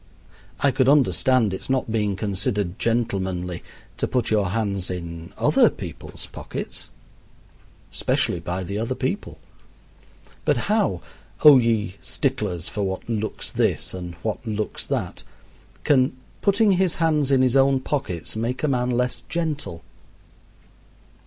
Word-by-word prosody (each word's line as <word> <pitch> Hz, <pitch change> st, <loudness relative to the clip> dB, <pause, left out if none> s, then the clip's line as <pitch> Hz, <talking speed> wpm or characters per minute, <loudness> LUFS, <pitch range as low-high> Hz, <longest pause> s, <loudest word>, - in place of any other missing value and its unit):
I 140 Hz, -, +4 dB
could 130 Hz, +1 st, +3 dB
understand 130 Hz, -6 st, +3 dB
its 95 Hz, -, -6 dB
not 130 Hz, -4 st, 0 dB
being 105 Hz, -3 st, +1 dB
considered 100 Hz, -1 st, -1 dB
gentlemanly 95 Hz, -6 st, -1 dB, 0.4 s
to -, -, 0 dB
put 125 Hz, -4 st, 0 dB
your 105 Hz, -3 st, +3 dB
hands 100 Hz, -3 st, -1 dB
in 85 Hz, -2 st, -6 dB
other -, -, +5 dB
people's -, -, -8 dB
pockets -, -, -6 dB, 1.0 s
(especially 90 Hz, -, +1 dB
by 90 Hz, +3 st, -3 dB
the 100 Hz, +3 st, -3 dB
other 115 Hz, +3 st, -1 dB
people), 140 Hz, +11 st, -3 dB, 1.1 s
but -, -, +2 dB
how, 110 Hz, -, +2 dB, 0.4 s
O 145 Hz, -3 st, +11 dB
ye 110 Hz, -5 st, 0 dB
sticklers 105 Hz, -, -1 dB
for 105 Hz, -, -3 dB
what 95 Hz, -1 st, -3 dB
looks 110 Hz, -2 st, -3 dB
this -, -, 0 dB
and 90 Hz, -2 st, -6 dB
what 110 Hz, 0 st, -2 dB
looks 110 Hz, -2 st, -3 dB
that, -, -, -2 dB, 0.6 s
can 130 Hz, -2 st, +3 dB, 0.2 s
putting 205 Hz, +1 st, +4 dB
his 185 Hz, -2 st, +2 dB
hands 155 Hz, -4 st, +2 dB
in 135 Hz, -2 st, +4 dB
his 130 Hz, 0 st, +2 dB
own 135 Hz, 0 st, +5 dB
pockets 130 Hz, -, -3 dB
make 120 Hz, +5 st, -2 dB
a -, -, +3 dB
man 125 Hz, -3 st, +1 dB
less 125 Hz, 0 st, 0 dB
gentle? 150 Hz, -, -3 dB
115 Hz, 135 wpm, -24 LUFS, 95-135 Hz, 1.1 s, O